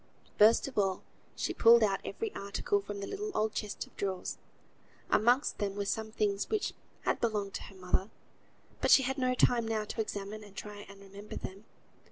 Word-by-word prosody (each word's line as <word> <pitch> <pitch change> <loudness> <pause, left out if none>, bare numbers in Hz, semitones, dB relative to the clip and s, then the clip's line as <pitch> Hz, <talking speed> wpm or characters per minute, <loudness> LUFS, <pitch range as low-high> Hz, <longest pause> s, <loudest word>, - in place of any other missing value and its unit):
First 220 +5 +6
of 265 -6 -2
all 195 -2 +1 0.3
she - - -2
pulled 230 0 +7
out 195 -2 +2
every 445 -2 -4
article 200 0 -1
from 200 0 -6
the - - -3
little 415 - -4
old 215 0 +1
chest 210 -2 -4
of - - -23
drawers. 190 -2 -3 0.7
Amongst 245 +6 +3
them 200 -1 -1
were 205 0 -2
some 220 +2 -2
things 205 -2 0
which 430 -2 0 0.3
had - - 0
belonged 210 -4 0
to - - -4
her 195 - -13
mother, 185 +2 -1 0.7
but - - +2
she 270 - +8
had 265 +2 -1
no 255 0 +2
time 240 -2 +3
now 220 -1 0
to 220 - -2
examine 210 0 -5
and 205 -1 -14
try 205 0 -8
and 200 0 -13
remember 200 +1 -10
them. 195 +3 -7
210 Hz, 195 wpm, -32 LUFS, 200-230 Hz, 0.7 s, she